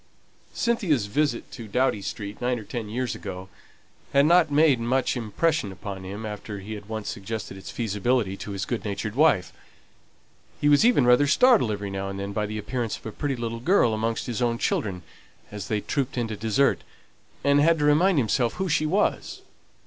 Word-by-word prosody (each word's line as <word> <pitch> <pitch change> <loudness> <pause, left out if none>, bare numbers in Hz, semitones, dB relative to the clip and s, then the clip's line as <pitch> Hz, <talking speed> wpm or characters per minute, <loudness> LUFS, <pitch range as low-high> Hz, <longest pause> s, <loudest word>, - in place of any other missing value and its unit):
Cynthia's 180 - +1
visit 135 +3 -1
to 115 -3 -8
Doughty 115 -1 +1
Street 100 +1 -6
nine 125 0 0
or 110 - -7
ten 110 -1 -5
years 125 +2 -2
ago 95 -1 -7 0.6
had 140 +1 +5
not 170 0 +5
made 145 -3 +4
much 125 +3 0
impression 125 +1 0
upon 95 0 -7
him 100 +4 -6
after 105 0 -6
he 100 +3 -7
had 105 0 -9
once 110 -1 -4
suggested 100 0 -5
its 95 - -10
feasibility 110 -1 0
to - - -8
his 100 -1 -3
good 120 - -3
natured 105 +1 -3
wife. 140 - +3 1.1
He 145 - +1
was 145 +3 +5
even 235 - +4
rather 125 +4 +5
startled 230 - +4
every 100 -1 -4
now 95 0 -3
and 100 0 -5
then 100 +1 -4
by 105 0 -1
the 110 +1 -5
appearance 115 0 -3
of - - -21
a 110 - -4
pretty 140 +4 -2
little 115 -1 -4
girl 125 - +3
amongst 115 +1 -1
his 120 0 -3
own 120 -1 +1
children, 95 -6 -1 0.5
as 105 -2 -6
they 105 -1 -1
trooped 135 +1 -2
in 120 -2 0
to 110 - -3
dessert, 110 +6 +1 0.6
and 140 0 +4
had 165 +2 +4
to 150 - 0
remind 165 +5 +4
himself 120 -1 +1
who 190 0 -3
she 155 -1 +2
was. 195 +6 -1
115 Hz, 195 wpm, -25 LUFS, 105-140 Hz, 1.1 s, had